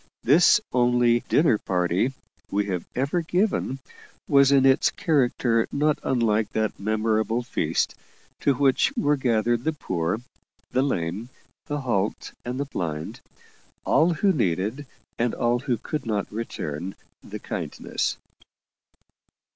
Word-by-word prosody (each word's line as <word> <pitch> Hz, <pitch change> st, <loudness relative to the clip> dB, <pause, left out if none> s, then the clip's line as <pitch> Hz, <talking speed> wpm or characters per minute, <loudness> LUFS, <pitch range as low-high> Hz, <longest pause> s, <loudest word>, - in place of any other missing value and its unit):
This 165 Hz, -, +6 dB
only 120 Hz, -1 st, +3 dB
"dinner 145 Hz, -9 st, +4 dB
party" 90 Hz, +6 st, 0 dB, 0.4 s
we 100 Hz, +1 st, 0 dB
had 90 Hz, -4 st, -3 dB
ever 140 Hz, +7 st, 0 dB
given, 175 Hz, -5 st, 0 dB, 0.5 s
was 140 Hz, -1 st, +5 dB
in 135 Hz, -1 st, +5 dB
its 135 Hz, 0 st, +4 dB
character 125 Hz, -, +1 dB
not 150 Hz, +1 st, +1 dB
unlike 110 Hz, -4 st, +1 dB
that 110 Hz, -1 st, -1 dB
memorable 110 Hz, +2 st, 0 dB
feast, 125 Hz, -, -1 dB, 0.5 s
to 140 Hz, -, +2 dB
which 135 Hz, -, +3 dB
were 150 Hz, -10 st, +3 dB
gathered 120 Hz, -2 st, +1 dB
the 160 Hz, -, 0 dB
poor, 90 Hz, -, -2 dB, 0.5 s
the 130 Hz, -, +2 dB
lame, 105 Hz, -3 st, -2 dB, 0.4 s
the 145 Hz, 0 st, -2 dB
halt, 105 Hz, -6 st, -2 dB
and 125 Hz, +2 st, -4 dB
the 140 Hz, -, -1 dB
blind 80 Hz, -, -5 dB, 0.6 s
all 165 Hz, +2 st, +3 dB
who 195 Hz, +4 st, +2 dB
needed, 110 Hz, -, -1 dB, 0.3 s
and 120 Hz, 0 st, 0 dB
all 120 Hz, +1 st, +1 dB
who 125 Hz, -2 st, -1 dB
could 135 Hz, +3 st, -5 dB
not 105 Hz, -2 st, -2 dB
return, 95 Hz, -6 st, -5 dB, 0.3 s
the -, -, -8 dB
kindness. -, -, -3 dB
120 Hz, 125 wpm, -25 LUFS, 105-140 Hz, 0.6 s, This